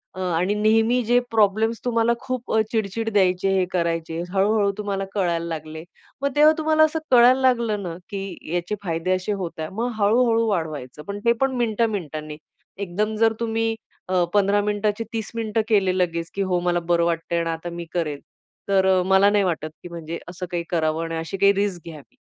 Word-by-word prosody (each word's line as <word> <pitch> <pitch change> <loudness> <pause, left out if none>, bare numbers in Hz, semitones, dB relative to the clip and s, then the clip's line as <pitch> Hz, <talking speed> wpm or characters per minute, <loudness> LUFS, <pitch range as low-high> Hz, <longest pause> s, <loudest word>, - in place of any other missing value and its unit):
आणि 180 +1 0
अ, - - -3
नेहमी 225 +3 +3
जे 245 +2 +4
प्रॉब्लेम्स 220 +1 +2
तुम्हाला 230 -1 +2
खूप 255 -2 -4
अ, 220 - +4
चिडचिड 225 0 -1
द्यायचे 190 -1 +2
हे 185 - +2
करायचे 165 -2 -1 0.2
हळू-हळू 200 +1 +2
तुम्हाला 200 -2 -2
कळायला 170 -4 0
लागले 160 -1 -6 0.4
मग 280 - +1
तेव्हा 305 +1 +6
तुम्हाला 315 0 +3
असं 315 +1 +1
कळायला 250 +2 +6
लागलं 235 -5 +2
ना, 170 -2 -5
की 195 -5 -6
याचे 175 +4 -1
फायदे 165 0 -2
असे 185 +3 -3
होत 180 -5 -5
आहे. 155 - -3
मग 235 +5 -2
हळू-हळू 230 +2 +3
वाढवायचं 150 -6 -3
पण 200 0 -4
ते 235 - +5
पण 270 -1 +1
मिनिटा 230 -1 +1
मिनिटांनी. 155 -6 -5 0.4
एकदम 200 +3 -2
जर 225 0 +4
तुम्ही 225 -1 0 0.6
15 205 0 +3
मिनिटाचे 210 +1 -1
30 220 -2 -4
मिनिटं 225 -1 0
केले 190 -4 +2
लगेच, 170 -2 -1
की 200 - -1
हो, 185 -2 +1
मला 175 0 +1
बरं 170 0 +1
वाटतं 165 0 -2
आहे - - +2
आणि 165 - -2
आता 165 +1 -5
मी 170 0 -6
करेल. 155 -5 -2 0.5
तर 190 -1 +4
मला 190 +1 +5
नाही 205 -1 +2
वाटत, 165 -4 -2
की 175 - -8
म्हणजे 170 -1 -6
असं 180 +1 -6
काही 175 -1 -2
करावं 160 -1 0
आणि 165 0 -4
अशी 165 +4 -4
काही 200 +1 +5
रिस्क 200 -4 -2
घ्यावी. 150 -4 -13
195 Hz, 190 wpm, -23 LUFS, 170-225 Hz, 0.6 s, तेव्हा